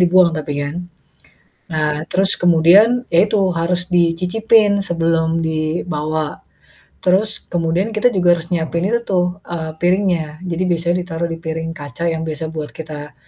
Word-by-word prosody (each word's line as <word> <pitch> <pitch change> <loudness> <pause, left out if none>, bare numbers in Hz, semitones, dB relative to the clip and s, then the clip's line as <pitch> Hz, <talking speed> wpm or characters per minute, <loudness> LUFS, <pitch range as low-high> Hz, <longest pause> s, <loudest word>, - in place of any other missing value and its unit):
dibuang 180 0 +5
tapi 150 -2 -4
kan. 145 +3 -4 1.0
Nah 150 -1 -1
terus 190 +1 +2
kemudian, 180 +9 +5
ya 170 +4 +6
itu 205 0 +1 0.2
harus 175 +1 -1
dicicipin 200 +5 +3
sebelum 165 -1 0
dibawa. 155 -1 -2 0.6
Terus 200 +4 +1
kemudian 175 +5 0
kita 215 +3 +3
juga 175 -3 +4
harus 170 0 -8
nyiapin 170 0 -1
itu 235 +1 +1
tuh, 180 -2 +2 0.2
eee, 160 -2 -4
piringnya. 175 -4 0
Jadi 175 0 -2
biasanya 170 0 +1
ditaruh 170 -1 -3
di 165 - -4
piring 165 0 -4
kaca 145 +2 -6
yang 160 0 -3
biasa 155 0 -4
buat 155 -2 -5
kita, 150 -2 -8
170 Hz, 145 wpm, -18 LUFS, 160-180 Hz, 1.0 s, ya